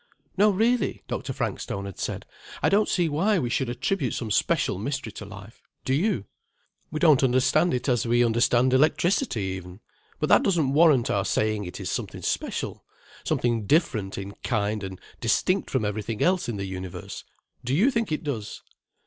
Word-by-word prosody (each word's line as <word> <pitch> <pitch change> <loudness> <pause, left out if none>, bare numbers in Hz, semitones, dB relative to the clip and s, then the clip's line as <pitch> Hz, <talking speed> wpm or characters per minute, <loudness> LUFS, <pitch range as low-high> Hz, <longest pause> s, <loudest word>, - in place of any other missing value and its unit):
"No, 205 +2 +5
really," 225 +5 +1
Dr. - - -4
Frankstone 100 0 -3
had 100 -2 -8
said, - - -4 0.4
"I - - +4
don't 205 +2 +3
see 175 -3 +2
why 185 +8 +1
we 125 -8 -1
should 130 0 0
attribute 130 +2 -1
some 115 -3 -4
special 95 - +1
mystery 135 0 -3
to 105 - -9
life—do 105 +5 -8
you? 145 - +1 0.6
We 155 - -4
don't 155 -4 +5
understand 130 +6 +3
it 125 - -3
as 120 -2 +1
we 120 +1 +4
understand 120 +2 +3
electricity, 155 - +2
even, 95 0 -6 0.4
but - - 0
that - - +6
doesn't 160 -8 +1
warrant 150 -6 +4
our 100 - +1
saying 110 0 0
it 90 - -7
is - - -4
something - - -4
special, - - -3 0.4
something 115 -4 0
different 115 - +1
in 100 0 -5
kind 105 -3 -1
and 95 -1 -6 0.2
distinct - - +1
from 110 - 0
everything 105 +1 -2
else 180 -6 +2
in 110 - -3
the 100 - -3
universe—do 95 +6 -7
you 225 - +4
think 230 -7 -1
it 155 - -2
does? 120 -9 -5
125 Hz, 170 wpm, -25 LUFS, 105-160 Hz, 0.6 s, that